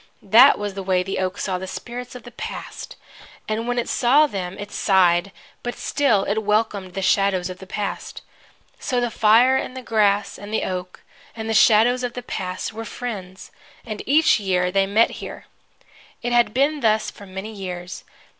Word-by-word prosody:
That 235 +8 +7
was 205 -1 -4
the 195 - -5
way 185 -1 +1
the 195 +1 -3
oak 185 0 -2
saw 185 -2 -2
the 190 - -6
spirits 245 +5 -7
of 250 - -9
the 245 - -11
Past, 245 - -7 0.5
and 220 +2 -2
when 245 0 -1
it 240 - -1
saw 270 +5 +4
them 190 -8 -5
it 205 0 -8
sighed; 185 -1 +3 0.3
but 245 - -4
still 235 -9 +1
it 205 +2 0
welcomed 210 -3 -1
the 195 - -3
shadows 190 -2 +2
of 180 - -10
the 190 - -11
Past. 205 +1 -5 0.6
So 250 - -1
the 240 -1 -1
fire, 230 +5 +5
and 260 - -4
the 260 - -7
grass, 205 -3 +1
and 205 +1 -9
the 220 - 0
oak, 180 -1 -5 0.3
and 220 -1 -5
the 225 - -1
shadows 230 +4 +5
of 245 -1 -3
the 250 - -6
Past 185 -2 -4
were 225 +1 -6
friends, 200 -5 -7 0.3
and 215 -3 -5
each 305 -1 +4
year 180 -3 0
they 195 +1 +2
met 215 +4 +3
here. - - -8 0.8
It 240 0 -1
had 240 -3 +4
been 280 +5 +1
thus 220 -3 +1
for 200 - -13
many 190 +4 -7
years. 180 -3 -7
210 Hz, 190 wpm, -22 LUFS, 190-240 Hz, 0.8 s, That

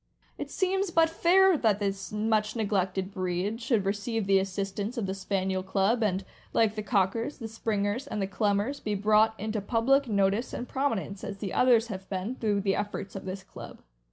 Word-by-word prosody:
It - - -4
seems 385 0 0
but 330 -1 +3
fair 375 +3 +5
that 220 -8 +2
this 195 -3 -3
much 215 0 0
neglected 190 -3 -1
breed 185 +4 -2
should 225 -4 +1
receive 205 +2 -1
the 195 0 +4
assistance 195 +4 -3
of 225 - -1
the 190 - -2
Spaniel 190 -1 -1
Club, 195 +5 +1
and, 195 -3 0 0.3
like 220 -2 +3
the 215 - -4
Cockers, 210 +5 0
the 230 - -6
Springers, 215 +1 -2
and 215 - -4
the 195 - +1
Clumbers, 205 +7 0
be 210 -1 -1
brought 215 +2 +3
into 215 +1 -2
public 250 +6 +2
notice 200 +2 +1
and 245 - -4
prominence, 225 -8 -2
as 200 -1 -5
the 195 -2 -5
others 240 -2 +4
have 190 -2 -7
been, 190 +5 -3
through 210 -5 0
the 195 0 +1
efforts 205 -1 -4
of 195 - -6
this 190 +1 -5
club. - - -10
210 Hz, 185 wpm, -28 LUFS, 195-230 Hz, 0.3 s, fair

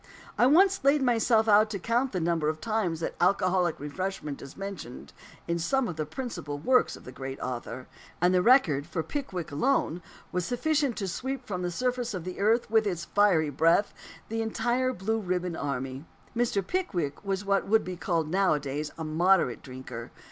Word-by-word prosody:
I 245 - +4
once 380 +6 +4
laid 280 +1 +4
myself 230 -2 +3
out 215 +1 +5
to 210 - -3
count 235 +7 0
the 185 - -1
number 165 -2 +1
of 155 0 -3
times 210 -7 -1
that - - -2
alcoholic 180 -2 +2
refreshment 150 0 -4
is 140 - -11
mentioned 195 -11 -7 0.3
in 170 0 0
some 265 +9 +1
of 175 - -4
the 155 -1 -3
principal 170 - -5
works 250 - +2
of - - -14
the 125 - -9
great 135 +1 -6
author; 125 0 -5 0.3
and 180 +1 +3
the 180 - +4
record, 180 - +4
for 165 -1 -2
Pickwick 185 - -4
alone, 175 - +1 0.3
was 180 0 -1
sufficient 280 - 0
to 195 - -2
sweep 260 +7 -4
from 185 -6 -4
the 180 - -1
surface 245 +3 -1
of 180 - -4
the 185 +1 -6
earth, 225 +4 +3
with 220 -1 +3
its 170 -3 -2
fiery 170 -4 +3
breath, 165 +8 +3 0.3
the 225 +1 -2
entire 240 +3 0
Blue 220 +1 -1
Ribbon 180 -3 -2
Army. 135 0 -4 0.3
Mr. 230 -5 +1
Pickwick 180 - -2
was 195 0 -2
what 200 0 +1
would 220 +2 +4
be 185 - -5
called 170 -3 -1
nowadays 150 -5 0
a 160 - -4
"moderate 160 - +2
drinker." 130 -3 -8
185 Hz, 185 wpm, -28 LUFS, 155-225 Hz, 0.3 s, out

